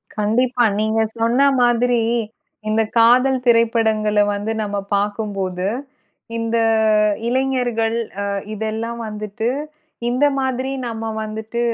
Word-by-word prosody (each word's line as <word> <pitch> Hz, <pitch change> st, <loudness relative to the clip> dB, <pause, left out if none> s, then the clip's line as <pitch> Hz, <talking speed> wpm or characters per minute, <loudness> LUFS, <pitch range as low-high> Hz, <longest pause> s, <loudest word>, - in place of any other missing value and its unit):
கண்டிப்பா. 240 Hz, +4 st, +1 dB, 0.2 s
நீங்க 220 Hz, +1 st, +1 dB, 0.2 s
சொன்ன 230 Hz, +3 st, +2 dB, 0.2 s
மாதிரி, 240 Hz, 0 st, +3 dB, 0.7 s
இந்த 220 Hz, +1 st, +2 dB, 0.2 s
காதல் 250 Hz, +3 st, +4 dB
திரைப்படங்கள்ல 220 Hz, -3 st, +3 dB
வந்து, 205 Hz, +2 st, -3 dB
நம்ம 205 Hz, 0 st, -3 dB, 0.2 s
பார்க்கும்போது 200 Hz, -3 st, -2 dB, 0.7 s
இந்த 230 Hz, 0 st, -1 dB, 0.7 s
இளைஞர்கள் 245 Hz, -3 st, 0 dB, 0.3 s
அ -, -, -2 dB, 0.3 s
இதெல்லாம் 220 Hz, +2 st, -3 dB
வந்துட்டு 210 Hz, +1 st, -5 dB, 0.6 s
இந்த 255 Hz, +4 st, +2 dB
மாதிரி 260 Hz, 0 st, -1 dB, 0.2 s
நம்ம 225 Hz, -1 st, -5 dB, 0.2 s
வந்துட்டு 220 Hz, +2 st, -5 dB
225 Hz, 95 wpm, -20 LUFS, 215-245 Hz, 0.7 s, காதல்